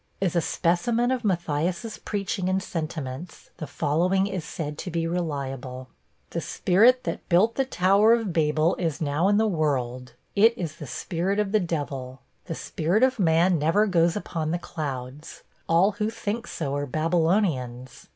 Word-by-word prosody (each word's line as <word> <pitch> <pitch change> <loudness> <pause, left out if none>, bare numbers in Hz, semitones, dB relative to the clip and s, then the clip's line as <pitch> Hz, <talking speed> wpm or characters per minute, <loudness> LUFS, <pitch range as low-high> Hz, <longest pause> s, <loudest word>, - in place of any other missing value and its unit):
As 185 -3 0
a 170 - +3
specimen 225 - +1
of 255 -2 -1
Matthias' 175 +2 -1
preaching 195 -2 -2
and 190 0 0
sentiments, 155 -1 -6
the 155 - -6
following 175 +8 +1
is 190 -4 -3
said 150 -1 -5
to - - -4
be 165 -1 -1
reliable: 135 -6 -4 0.4
'The - - -2
spirit 235 +8 +3
that - - -5
built 195 +6 +4
the 270 - 0
Tower 200 +1 +4
of 220 -6 -3
Babel 155 +1 +2
is 165 -5 -2
now 155 +4 +1
in 205 0 +3
the 220 - +3
world 130 - -1 0.2
it 225 +3 +5
is 165 -4 -4
the 150 -5 -8
spirit 180 - -2
of 210 -2 0
the 215 - +4
devil. 140 -7 -4 0.2
The 165 - -4
spirit 175 +11 0
of 260 -2 +3
man 170 0 +3
never 165 +8 +3
goes 170 -4 +2
upon 165 -6 -3
the 170 - 0
clouds; 145 -4 -6 0.3
all 175 +5 +4
who 210 +1 -2
think 230 +1 -4
so 140 -4 -3
are 145 0 -2
Babylonians. 155 - 0
170 Hz, 165 wpm, -25 LUFS, 150-200 Hz, 0.4 s, it